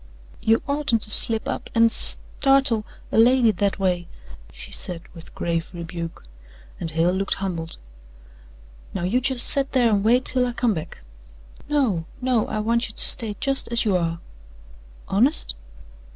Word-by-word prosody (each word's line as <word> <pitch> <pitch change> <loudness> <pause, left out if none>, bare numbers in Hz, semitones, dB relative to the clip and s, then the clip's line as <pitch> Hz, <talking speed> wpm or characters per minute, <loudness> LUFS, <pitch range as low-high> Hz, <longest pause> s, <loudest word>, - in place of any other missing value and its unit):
"You 225 +1 +1
oughtn't 280 -6 -1
to 215 - -5
slip 225 0 +4
up - - -5
an' 230 0 +4
s 230 - +5 0.2
startle 270 -5 +1 0.2
a - - +1
lady 240 0 +4
that 200 0 -2
a - - -19
way," 180 -2 -2 0.4
she - - -11
said 175 -3 -3
with 165 -2 -13
grave 165 -1 -3
rebuke, 170 -1 -8 0.6
and 165 - -5
Hale 165 +2 0
looked 195 +2 -2
humbled. 170 -4 -6 1.2
"Now 185 - -4
you 220 +8 0
just 255 -1 +6
set 275 0 +2
there 245 -4 +2
and 200 -1 0
wait 245 +4 +2
till 255 -1 0
I 245 - -5
come 235 -2 0
back." 160 - -8 0.7
"No 240 - 0
no 250 -3 -1
I - - -4
want 235 +1 -1
you 215 - -13
to - - +2
stay 220 -3 +5
just 275 -1 0
as 235 0 -1
you 200 -3 +1
are." 170 -1 -2 0.9
"Honest?" 240 - +3
220 Hz, 165 wpm, -22 LUFS, 180-250 Hz, 1.2 s, just